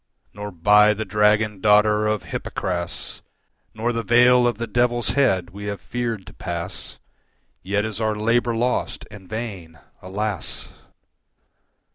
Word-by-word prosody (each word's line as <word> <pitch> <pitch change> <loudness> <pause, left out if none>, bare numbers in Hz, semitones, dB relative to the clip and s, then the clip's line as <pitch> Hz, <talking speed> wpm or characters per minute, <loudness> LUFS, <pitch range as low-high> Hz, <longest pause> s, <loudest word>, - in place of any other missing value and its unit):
Nor 105 0 -6
by 105 +4 +5
the 110 - -4
dragon 105 0 +2
daughter 105 +1 +4
of 105 -2 -1
Hypocras 85 -2 -4 0.5
Nor 115 +2 -1
the 115 - -1
vale 125 +1 +5
of 120 - -1
the 115 - -3
Devil's 120 0 +1
head 110 -9 +1
we 100 +2 -8
have 100 -1 -4
feared 115 -5 -4
to 100 - -12
pass, 90 -1 -6 0.6
Yet 105 +2 -1
is 110 0 -4
our 110 -1 +1
labour 115 +2 +1
lost 125 +2 -1
and 95 -3 -12
vain, 100 -8 -6 0.2
alas! 100 0 -3
105 Hz, 135 wpm, -22 LUFS, 100-115 Hz, 0.6 s, by